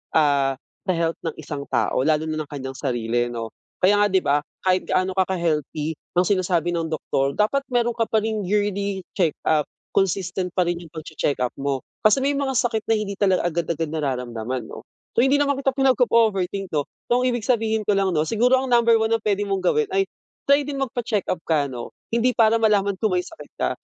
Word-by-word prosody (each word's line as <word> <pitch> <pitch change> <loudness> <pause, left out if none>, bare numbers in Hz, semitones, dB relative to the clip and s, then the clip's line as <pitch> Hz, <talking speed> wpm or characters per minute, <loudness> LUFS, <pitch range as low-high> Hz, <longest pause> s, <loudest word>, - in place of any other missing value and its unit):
ah 140 -3 +3 0.3
sa - - +3
health 165 0 -1
ng 160 - -3
isang 145 -2 -6
tao, - - 0
lalo 155 0 +2
na 155 - -2
ng 150 - -18
kanyang 135 -2 -6
sarili 120 -2 0
'no. 115 -2 -5 0.3
Kaya 205 +2 +5
nga 205 - +5
'di 190 -2 +1
ba 145 +1 +3 0.2
kahit 185 0 +1
gaano 185 0 +1
ka 190 0 +1
healthy 155 -2 -1 0.2
ang 180 - +4
sinasabi 180 -3 +1
ng 165 -1 -1
doktor 140 -3 -1
dapat 245 +7 +1
meron 240 -1 +1
ka 230 -1 0
pa 220 -1 +1
ring 220 -2 -1
yearly 200 -1 0 0.2
check 170 -4 +2
up, 150 -2 +2 0.2
consistent 185 -1 0
pa 185 - +3
rin 175 0 -1
'yung 170 -3 -12
pag-che-check 155 -2 -2
up 125 - -1
mo. 135 -1 -2 0.2
Kasi 265 +6 +3
may 280 - +2
mga 275 -2 -1
sakit 225 -3 0
na 225 - +3
hindi 200 -2 -3
talaga 190 -3 +3
agad-agad 165 -1 -2
nararamdaman 125 -5 -3
'no. - - -10 0.3
So - - +5
hindi 270 +2 +4
naman 280 -1 +1
kita 270 -1 0
pinag-o-overthink 220 -7 +2
'no. 145 -2 -1 0.2
So 245 - +4
ang - - +1
ibig 240 -3 -1
sabihin 220 -2 +1
ko 210 - +1
lang 190 -3 +1
'no, 155 - +3
siguro 235 +8 +3
ang 260 - -4
number 235 -1 +5
1 220 0 +1
na 230 - +3
puwede 205 -2 0
mong 195 -2 -1
gawin 450 -2 +2
ay 390 - +4 0.4
try 280 +1 +5
din 280 -1 -4
mag 270 - 0
pa-check-up 215 -7 -1
ka 150 -3 +1
'no. 125 -3 -7 0.2
Hindi 235 +2 +2
para 225 -2 +4
malaman 205 -3 +2
kung 215 +1 0
may 180 - +2
sakit 330 - -12
ka, - - +1
190 Hz, 210 wpm, -23 LUFS, 155-225 Hz, 0.4 s, Kaya